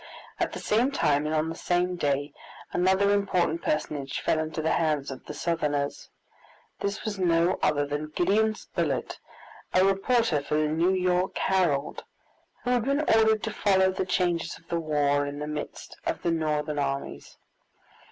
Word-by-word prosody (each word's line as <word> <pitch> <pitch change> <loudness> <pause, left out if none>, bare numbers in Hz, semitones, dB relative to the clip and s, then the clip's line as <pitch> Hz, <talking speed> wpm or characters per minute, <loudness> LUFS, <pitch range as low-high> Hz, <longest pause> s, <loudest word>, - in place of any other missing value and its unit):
At - - -1
the - - -5
same 235 +5 +2
time 150 - +1
and 155 - -1
on 155 +1 +1
the 165 - -5
same 180 +1 0
day 145 -3 -1 0.4
another 190 +3 +3
important 180 -5 +1
personage 145 -3 -2
fell 160 - +1
into 155 0 -3
the 160 +1 0
hands 150 -4 0
of 130 - -8
the - - -7
Southerners. 145 -4 -2 0.7
This 200 +1 -3
was 210 -3 -3
no 170 0 +2
other 145 -1 +2
than 145 +1 -4
Gideon 215 +4 +2
Spilett, - - -3 0.6
a 185 +1 +5
reporter 195 - +2
for 145 - -2
the 155 0 +2
New 165 +4 +2
York 180 0 +1
Herald, 170 -7 0 0.6
who 245 - 0
had 245 -2 +2
been 280 +2 +1
ordered 220 -6 +3
to 220 - -3
follow 190 -2 +3
the 185 - -3
changes 175 -3 0
of 165 - -23
the 170 - 0
war 145 -2 +1
in 145 0 -5
the 150 - -4
midst 150 0 -6
of - - -3
the 170 - +1
Northern 150 -2 -1
armies. 140 -1 -4
165 Hz, 170 wpm, -27 LUFS, 150-190 Hz, 0.7 s, a